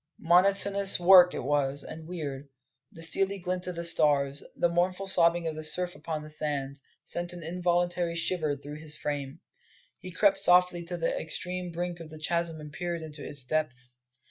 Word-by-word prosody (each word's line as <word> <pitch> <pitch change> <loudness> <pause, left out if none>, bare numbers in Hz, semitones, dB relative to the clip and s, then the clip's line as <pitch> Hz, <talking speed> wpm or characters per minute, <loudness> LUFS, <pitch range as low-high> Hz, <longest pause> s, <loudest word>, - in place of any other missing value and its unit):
Monotonous 195 +3 +3
work 180 0 +7
it - - -4
was, 140 0 0
and 160 0 -9
weird. 145 -5 -6 0.4
The 165 - -11
steely 195 +4 0
glint 180 0 -3
of 180 - -4
the 170 - -4
stars, 145 -4 +2
the - - +2
mournful 180 +3 0
sobbing 175 -2 +3
of 160 - -2
the 155 - -6
surf 180 +3 +2
upon 155 -2 -5
the 155 - -10
sands, 140 -2 -3 0.2
sent 175 0 -2
an 175 -2 -9
involuntary 175 0 0
shiver 160 -4 -1
through 145 +1 -9
his 150 -1 -1
frame. 140 -2 -4 0.6
He 185 - -8
crept 195 +2 +3
softly 180 -1 +5
to 175 +1 -4
the 165 - -1
extreme 180 +2 -4
brink 175 +1 -4
of 165 -2 -9
the 155 - -10
chasm 165 +1 -1
and 150 -1 -10
peered 175 -2 -4
into 150 -2 -8
its 140 -3 -3
depths. 130 -4 -2
170 Hz, 180 wpm, -28 LUFS, 150-180 Hz, 0.6 s, work